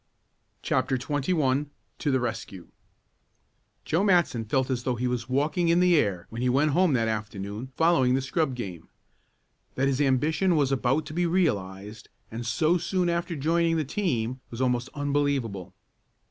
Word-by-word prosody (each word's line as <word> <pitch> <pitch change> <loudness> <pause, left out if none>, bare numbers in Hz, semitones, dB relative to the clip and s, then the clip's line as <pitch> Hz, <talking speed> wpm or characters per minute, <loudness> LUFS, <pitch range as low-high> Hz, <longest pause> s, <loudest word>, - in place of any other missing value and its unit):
CHAPTER 130 - +1
XXI 145 +1 0 0.3
TO - - -1
THE 130 -1 +2
RESCUE 110 -7 -5 1.2
Joe 170 +5 +1
Matson 175 - +2
felt 130 +4 0
as 125 -2 -1
though 125 0 -1
he 125 +2 -1
was 125 0 -3
walking 155 +6 +1
in 170 +1 +4
the 180 -1 +4
air 100 - +1
when 115 +1 -5
he 125 - +1
went 145 +4 +2
home 175 0 +3
that 115 -3 +1
afternoon 105 +2 -4
following 140 -7 +3
the 135 - 0
scrub 135 -1 -1
game. 90 -9 -7 0.9
That 135 +2 +1
his 135 +1 0
ambition 155 +7 +2
was 140 -3 +2
about 135 +3 +1
to - - -8
be 175 +1 +1
realized, 105 - -2 0.2
and 115 +1 -5
so 165 +6 +2
soon 180 +1 0
after 170 0 -2
joining 165 +3 +1
the 155 - -1
team, 130 - -2
was 115 - -8
almost 125 -1 0
unbelievable. 140 -9 -1
135 Hz, 160 wpm, -26 LUFS, 120-160 Hz, 1.2 s, in